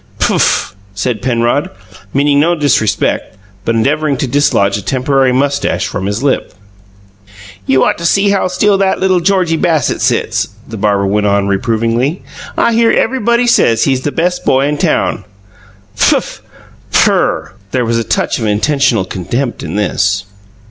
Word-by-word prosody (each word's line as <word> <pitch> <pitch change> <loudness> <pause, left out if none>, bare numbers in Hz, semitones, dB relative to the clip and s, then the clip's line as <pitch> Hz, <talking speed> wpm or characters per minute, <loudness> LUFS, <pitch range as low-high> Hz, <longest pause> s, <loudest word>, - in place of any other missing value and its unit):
"Pfuff!" - - +1 0.2
said 110 +1 -2
Penrod, 120 +3 0 0.4
meaning 140 +1 +2
no 170 +4 +2
disrespect, 140 - 0 0.3
but 115 - 0
endeavoring 140 +5 0
to 135 - -1
dislodge 120 -7 +1
a 105 - -3
temporary 130 +5 +1
moustache 140 +2 0
from 95 - -4
his 105 +5 -3
lip. 140 - -1 1.1
"You 130 0 +3
ought - - 0
to 170 - -5
see 200 +3 +2
how 195 -2 +1
still 195 +2 +1
that 195 -1 +1
little 185 -1 +2
Georgie 180 -3 +1
Bassett 160 -6 0
sits," - - 0 0.2
the 115 - -7
barber 100 -1 0
went 105 +1 0
on, 100 0 +1
reprovingly. 115 - -1 0.3
"I 235 - +2
hear 230 0 +3
everybody 235 -1 +1
says 115 - +3
he's 130 -2 +1
the 145 - -2
best 180 +3 -1
boy 135 +1 +2
in 145 0 -2
town." - - 0 0.7
"Pfuff! - - +1 0.5
PHIRR!" - - +1 0.2
There 125 +3 -1
was 115 0 0
a - - -1
touch - - -1
of 110 - -2
intentional 115 -1 +1
contempt 120 +8 -3
in 80 +4 -5
this. 100 -1 0
130 Hz, 155 wpm, -13 LUFS, 110-160 Hz, 1.1 s, You